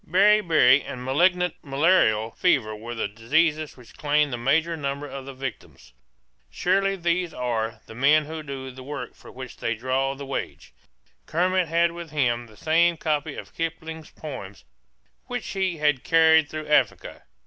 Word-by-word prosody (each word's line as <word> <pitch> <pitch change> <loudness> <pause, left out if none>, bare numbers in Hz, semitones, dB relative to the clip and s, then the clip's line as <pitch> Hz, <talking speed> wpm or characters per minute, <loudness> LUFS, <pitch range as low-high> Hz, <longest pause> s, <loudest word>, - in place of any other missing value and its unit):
Beriberi 180 -7 +5
and 125 0 -7
malignant 180 +5 +2
malarial 135 -7 +2
fever 120 -12 +1
were 115 +3 -7
the 115 - -1
diseases 150 +9 0
which 125 -2 -16
claimed 150 -2 +1
the - - 0
major 160 +7 +1
number 140 -1 -4
of 135 -1 -8
the 135 - -7
victims. 130 - -8 0.6
Surely 195 +2 +1
these 175 -1 -1
are 115 -2 -2
"the - - -11
men 145 +5 +4
who 160 +1 -6
do 135 -3 -7
the 130 +1 -11
work 135 -2 -6
for - - -15
which 130 -1 -9
they 115 - -2
draw 130 +4 -1
the 140 +1 -8
wage." 135 - -5 0.5
Kermit 180 +1 +1
had 170 +1 +2
with 170 -1 -8
him 120 -5 0
the 110 -2 -18
same 170 +2 +3
copy 155 -2 -1
of - - -9
Kipling's 160 -1 -5
poems 105 - -9 0.6
which 245 -1 -4
he 190 -4 -1
had 150 -3 +1
carried 160 -2 +5
through 155 -1 -6
Africa. 145 -7 +1
150 Hz, 160 wpm, -25 LUFS, 130-165 Hz, 0.6 s, Beriberi